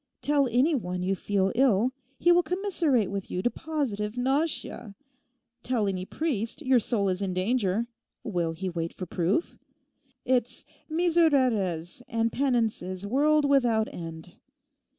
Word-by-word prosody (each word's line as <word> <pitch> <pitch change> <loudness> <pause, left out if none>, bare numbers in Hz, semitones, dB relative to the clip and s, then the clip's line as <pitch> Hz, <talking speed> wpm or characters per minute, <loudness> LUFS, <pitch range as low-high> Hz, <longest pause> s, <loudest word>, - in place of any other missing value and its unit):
Tell 285 -2 +3
any 250 +7 +2
one 180 -9 -2
you 195 +1 +1
feel 195 +1 0
ill; 245 -2 +3 0.3
he 350 - +4
will 350 0 +6
commiserate 335 - +1
with 200 -1 -4
you 180 - -3
to 245 - +2
positive 240 -9 -3
nausea. 265 -5 -1 0.7
Tell 235 -5 0
any 185 -2 -2
priest 255 0 -2
your 260 -2 +4
soul 215 -3 0
is 185 +1 -1
in 190 -2 -2
danger; 205 +1 +1 0.4
will 175 -6 -1
he 185 +4 -5
wait 170 -2 -3
for 185 - -5
proof? 180 - -1 0.7
It's 250 -2 0 0.2
misereres 260 - +2
and 230 -3 0
penances 220 -8 -1
world 290 +6 +3
without 240 -6 +3
end. 165 -2 -8
230 Hz, 135 wpm, -27 LUFS, 190-275 Hz, 0.7 s, will